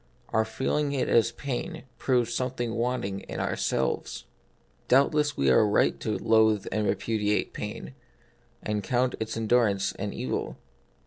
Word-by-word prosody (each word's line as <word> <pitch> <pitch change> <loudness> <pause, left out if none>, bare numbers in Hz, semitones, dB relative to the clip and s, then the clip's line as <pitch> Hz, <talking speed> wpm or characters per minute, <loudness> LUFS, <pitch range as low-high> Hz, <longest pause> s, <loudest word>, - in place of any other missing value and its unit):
Our 110 0 +2
feeling 140 +5 -1
it 135 - 0
as 115 -2 +4
pain, 160 +5 -5 0.2
proves 120 -3 +1
something 120 -2 -2
wanting 115 -5 -1
in - - -7
our - - -1
selves. - - -2 0.6
Doubtless 145 +3 +3
we 70 -1 +3
are 65 - +6
right 105 -1 +2
to - - -2
loathe 110 -2 +3
and 105 -1 0
repu 110 +2 -1
diate 105 0 0
pain, - - -6 0.7
and 105 -1 -1
count 125 +3 +1
its 110 0 -3
endurance 110 -3 +2
an 100 +1 -2
evil. 65 - -3
115 Hz, 145 wpm, -27 LUFS, 105-125 Hz, 0.7 s, are